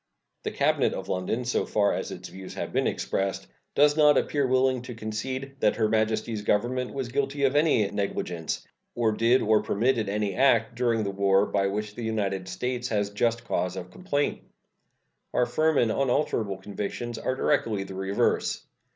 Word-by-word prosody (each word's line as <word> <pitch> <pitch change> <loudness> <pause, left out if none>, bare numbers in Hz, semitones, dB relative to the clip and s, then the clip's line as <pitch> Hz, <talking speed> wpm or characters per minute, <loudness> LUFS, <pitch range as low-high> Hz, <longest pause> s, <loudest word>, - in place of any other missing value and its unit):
The - - -2
cabinet - - +1
of - - -6
London, 95 +7 -1
so 125 - +1
far 100 -1 +2
as - - -3
its - - -7
views 95 0 -9
have - - -5
been - - +2
expressed, 95 -9 -2 0.3
does 145 +1 +5
not 150 -1 +6
appear 145 - +1
to 135 - +2
be - - -4
willing 130 -1 +3
to 125 -1 -8
concede 130 +5 -5
that 105 - +3
Her 110 -2 +2
Majesty's 110 0 0
Government 120 +5 0
was 135 -3 -4
guilty 140 +2 -1
of 135 +1 +3
any 145 -9 +4
negligence, 90 -5 -3 0.3
or 115 -2 +2
did 115 +4 +3
or 110 0 +4
permitted 115 0 +1
any 105 -1 -1
act 125 0 +3
during 115 -2 +1
the 100 - -2
war 100 0 +3
by 100 -1 +1
which 105 +1 -3
the 120 - -8
United 100 -4 -2
States 125 +6 -3
has 105 -3 -1
just 115 +2 0
cause 90 -5 -1
of 90 -1 -7
complaint. 145 - -1 0.9
Our 125 - +4
firm 155 +2 +1
and 115 -2 +3
unalterable 120 -6 0
convictions 105 +4 -5
are 130 - -1
directly 115 -7 +1
the 95 0 -9
reverse. 95 +1 0
110 Hz, 180 wpm, -27 LUFS, 100-130 Hz, 0.9 s, not